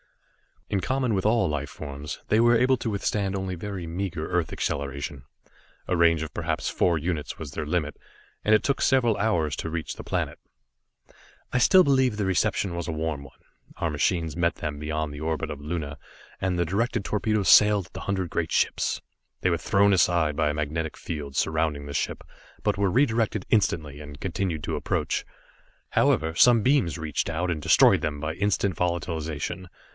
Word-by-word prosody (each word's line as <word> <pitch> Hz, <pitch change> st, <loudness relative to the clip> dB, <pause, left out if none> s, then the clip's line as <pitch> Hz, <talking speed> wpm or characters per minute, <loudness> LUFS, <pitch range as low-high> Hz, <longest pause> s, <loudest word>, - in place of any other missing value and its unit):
In 100 Hz, -, 0 dB
common 130 Hz, +2 st, 0 dB
with 95 Hz, -1 st, -1 dB
all 110 Hz, -4 st, +3 dB
life 75 Hz, -1 st, -3 dB
forms, 70 Hz, 0 st, -7 dB
they 110 Hz, -, +4 dB
were 120 Hz, +1 st, +5 dB
able 130 Hz, +2 st, +3 dB
to 115 Hz, -, -3 dB
withstand 100 Hz, -1 st, -1 dB
only 95 Hz, -1 st, -3 dB
very 95 Hz, 0 st, -5 dB
meager 85 Hz, -2 st, -3 dB
earth 90 Hz, -2 st, 0 dB
acceleration. 70 Hz, -1 st, -3 dB, 0.6 s
A 90 Hz, -, +1 dB
range 85 Hz, -2 st, +4 dB
of 80 Hz, -, -7 dB
perhaps -, -, -2 dB
four 85 Hz, -2 st, +2 dB
units 80 Hz, -1 st, -3 dB
was 75 Hz, -4 st, -7 dB
their 75 Hz, +1 st, -4 dB
limit, 75 Hz, -2 st, -1 dB, 0.5 s
and 110 Hz, -, +5 dB
it 110 Hz, -, +2 dB
took 140 Hz, -, 0 dB
several 120 Hz, -5 st, +3 dB
hours 85 Hz, -9 st, +1 dB
to 80 Hz, -, -4 dB
reach 80 Hz, -1 st, -4 dB
the -, -, -8 dB
planet. -, -, -2 dB, 1.1 s
I -, -, +1 dB
still 185 Hz, +9 st, +7 dB
believe 130 Hz, -5 st, +3 dB
the 105 Hz, -1 st, -1 dB
reception 95 Hz, 0 st, +1 dB
was 85 Hz, -1 st, -4 dB
a 80 Hz, -, -2 dB
warm 80 Hz, -2 st, -2 dB
one. 65 Hz, -, -15 dB, 0.4 s
Our 85 Hz, -, -1 dB
machines 80 Hz, +2 st, 0 dB
met 85 Hz, -1 st, +1 dB
them 75 Hz, -2 st, -5 dB
beyond 75 Hz, 0 st, -3 dB
the 75 Hz, -, -7 dB
orbit 80 Hz, 0 st, -2 dB
of 75 Hz, -, -6 dB
Luna, 75 Hz, -2 st, -4 dB, 0.4 s
and 95 Hz, -1 st, -1 dB
the 85 Hz, -, +1 dB
directed 115 Hz, +5 st, -1 dB
torpedoes 105 Hz, -1 st, 0 dB
sailed 105 Hz, -3 st, +6 dB
at -, -, -29 dB
the -, -, -6 dB
hundred 95 Hz, -3 st, -2 dB
great 80 Hz, -1 st, -1 dB
ships. -, -, +1 dB, 0.4 s
They 95 Hz, -, +2 dB
were 85 Hz, -, +2 dB
thrown 100 Hz, +4 st, +3 dB
aside 85 Hz, -5 st, +2 dB
by 75 Hz, -2 st, +2 dB
a -, -, -1 dB
magnetic 75 Hz, +1 st, -3 dB
field 70 Hz, -4 st, -6 dB
surrounding 80 Hz, -2 st, 0 dB
the 70 Hz, -, -7 dB
ship, 75 Hz, -, -2 dB, 0.4 s
but -, -, +1 dB
were 100 Hz, -1 st, +2 dB
redirected 110 Hz, -4 st, +1 dB
instantly, 75 Hz, -9 st, +1 dB
and 75 Hz, -1 st, -10 dB
continued 90 Hz, -4 st, -2 dB
to -, -, -2 dB
approach. -, -, -1 dB, 0.6 s
However, 80 Hz, 0 st, +2 dB
some 115 Hz, +5 st, +5 dB
beams 130 Hz, -, +2 dB
reached 80 Hz, -3 st, -2 dB
out, 90 Hz, +3 st, -1 dB
and 80 Hz, -2 st, -3 dB
destroyed -, -, +5 dB
them 75 Hz, -1 st, -3 dB
by 75 Hz, +1 st, -2 dB
instant 100 Hz, -1 st, 0 dB
volatilization. 85 Hz, 0 st, -2 dB
85 Hz, 185 wpm, -26 LUFS, 75-100 Hz, 1.1 s, still